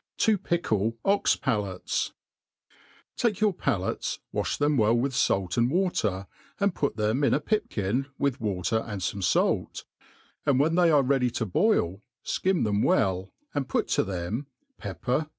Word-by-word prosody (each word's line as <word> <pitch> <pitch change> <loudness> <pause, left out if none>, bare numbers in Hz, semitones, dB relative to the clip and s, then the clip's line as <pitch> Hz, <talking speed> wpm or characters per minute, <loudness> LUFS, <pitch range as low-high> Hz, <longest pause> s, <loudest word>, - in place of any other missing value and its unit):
To 220 - +5
pickle 115 - -1
Ox 200 +1 +3
Palates. 100 -4 -2 1.0
TAKE 225 -5 +1
your 210 -2 +3
palates, 110 - -1 0.2
wafli - - -1
them 145 0 +2
well 110 -2 +3
with 130 +3 0
fait 95 -9 +1
and 120 +1 +3
water, 130 - 0 0.3
and 200 -2 +2
put 140 -9 -1
them 110 +6 +1
in 135 - +4
a - - +1
pipkin 135 - -1
with 140 -1 -1
water 105 +1 0
and 105 -3 -5
fome 100 +1 -2
fait; - - +1 0.6
and 135 -2 +2
when 155 +4 +3
they 175 0 +4
are 145 -3 +5
ready 130 -1 +2
to 115 -1 -2
boil, 95 - +1 0.2
fkim 190 -2 +1
them 105 -1 +1
well, 95 -1 +1 0.2
and 140 -3 -2
put - - 0
to - - +2
them 95 +8 -4 0.3
pepper, - - -7
cloves. 140 +5 0
125 Hz, 160 wpm, -27 LUFS, 100-150 Hz, 1.0 s, To